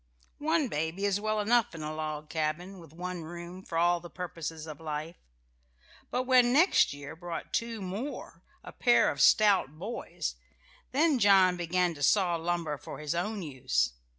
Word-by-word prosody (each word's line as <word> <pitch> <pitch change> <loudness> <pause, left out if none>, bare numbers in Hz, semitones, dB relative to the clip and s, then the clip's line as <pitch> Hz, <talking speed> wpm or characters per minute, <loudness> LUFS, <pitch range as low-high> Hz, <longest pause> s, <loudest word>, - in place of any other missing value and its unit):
One 315 -1 +1
baby 160 +2 -2
is 200 0 +1
well 215 0 0
enough 225 -2 +2
in 160 - -6
a 155 0 -4
log 155 -1 -4
cabin, 160 +5 -3
with 165 -4 -14
one 180 +1 -5
room 175 +3 -8
for 165 - -5
all 175 +1 +3
the 175 0 -11
purposes 165 -3 -6
of 155 -3 -8
life; 155 +1 -5 0.9
but 250 - -1
when 250 -1 +5
next 320 +9 +4
year 145 +1 -8
brought 170 0 -7
two 230 -3 -2
more, 210 +10 -6 0.2
a - - -9
pair 240 -2 +4
of - - -3
stout 195 -9 +4
boys, 210 +8 -5 0.5
then 290 0 +3
John 195 -3 +6
began 175 0 0
to 145 - -11
saw 180 +3 +3
lumber 165 -3 -2
for - - -8
his 150 0 -3
own 195 +4 -2
use. 125 - 0
175 Hz, 170 wpm, -29 LUFS, 160-210 Hz, 0.9 s, John